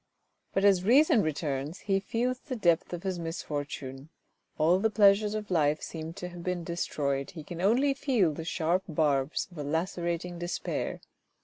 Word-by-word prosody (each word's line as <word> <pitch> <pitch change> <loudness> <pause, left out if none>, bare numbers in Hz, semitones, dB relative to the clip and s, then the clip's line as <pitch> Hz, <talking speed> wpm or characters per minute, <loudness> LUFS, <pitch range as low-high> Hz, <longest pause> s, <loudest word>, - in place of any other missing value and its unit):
But 195 - +1
as 190 -3 +5
reason 250 +2 +5
returns 150 0 -2
he 195 -1 +1
feels 245 +5 -1
the 260 -2 -6
depth 175 -7 +2
of 175 0 -5
his 190 -2 -2
misfortune. 145 -4 -5 0.5
All 170 +4 +4
the 220 +3 +2
pleasures 210 0 +4
of 210 -2 -5
life 155 -3 +2
seem 160 0 -6
to 180 +1 -6
have 175 -1 -9
been 180 -1 -2
destroyed, 140 -5 -2
he 160 -3 -9
can 170 +2 -7
only 250 +8 +3
feel 245 - +1
the 160 - -6
sharp 170 +2 0
barbs 150 -2 +1
of 175 - -10
a - - -2
lacerating 170 +2 -2
despair. 175 0 -3
175 Hz, 170 wpm, -29 LUFS, 155-200 Hz, 0.5 s, as